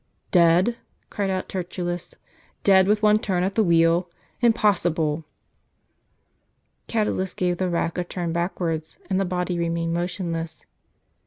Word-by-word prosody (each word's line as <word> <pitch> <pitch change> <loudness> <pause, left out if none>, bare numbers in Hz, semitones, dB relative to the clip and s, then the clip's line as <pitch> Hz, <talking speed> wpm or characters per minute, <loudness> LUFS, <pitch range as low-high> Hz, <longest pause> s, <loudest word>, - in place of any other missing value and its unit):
" - - -42
Dead! 180 +8 +4 0.2
" - - -44
cried 200 -2 -1
out 185 -1 -2
Tertullus; 175 -1 -4 0.2
" - - -34
dead 190 -1 +5
with 210 +1 +2
one 210 0 +5
turn 185 -4 0
of 195 +2 -1
the 220 - +3
wheel? 170 0 +3 0.3
impossible!" 175 -9 +2 1.6
Catulus 210 -4 -1
gave 180 -1 0
the 185 -1 0
rack 170 0 -1
a - - 0
turn 175 -1 -4
backwards, 170 -2 -2
and 190 - +2
the - - +1
body 180 -1 -2
remained 165 0 -1
motionless. 170 -2 -3
180 Hz, 145 wpm, -24 LUFS, 170-190 Hz, 1.6 s, dead